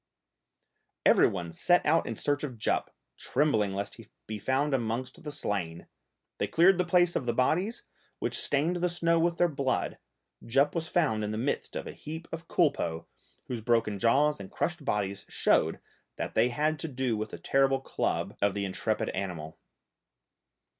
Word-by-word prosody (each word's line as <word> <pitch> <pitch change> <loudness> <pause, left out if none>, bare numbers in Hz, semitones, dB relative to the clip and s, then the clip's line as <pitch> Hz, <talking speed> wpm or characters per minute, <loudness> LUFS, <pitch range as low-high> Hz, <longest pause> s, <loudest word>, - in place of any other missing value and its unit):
Every - - +6
one 85 -3 -4
set 175 - +3
out 165 +2 +3
in 115 - -3
search 145 +6 -1
of 130 -5 -4
Jup, 110 - 0 0.3
trembling 120 -8 +1
lest 100 0 -4
he - - -11
should - - -33
be 110 -1 -5
found 135 +6 0
amongst 130 +6 -2
the 150 - -5
slain; 90 - -3 0.5
they - - 0
cleared 180 +3 +5
the 180 - +2
place 175 0 +3
of 125 - -1
the 120 - 0
bodies 180 - +1 0.3
which - - -2
stained 155 +5 +1
the 180 +1 +1
snow 170 -1 +2
with 170 0 +1
their 175 - +4
blood, 140 -4 -1 0.4
Jup 135 +5 +2
was 165 -2 -2
found 145 -12 +1
in 105 - -2
the 110 - -3
midst 130 +6 -2
of - - -3
a - - -6
heap 160 +2 -8
of 165 0 -6
culpeux, 135 - +1 0.4
whose 120 -3 -4
broken 110 -3 +1
jaws 140 +7 +3
and 95 -1 -8
crushed 175 -2 -2
bodies 100 -6 -1
showed - - +2 0.4
that - - -4
they 125 - +3
had 150 +5 0
to - - -4
do 130 -4 -1
with 110 0 -3
the - - -7
terrible 135 0 +2
club 135 - -2
of 100 -1 +2
the 100 -1 -1
intrepid 105 +3 -1
animal. 85 -5 -5
135 Hz, 180 wpm, -29 LUFS, 110-160 Hz, 0.5 s, Every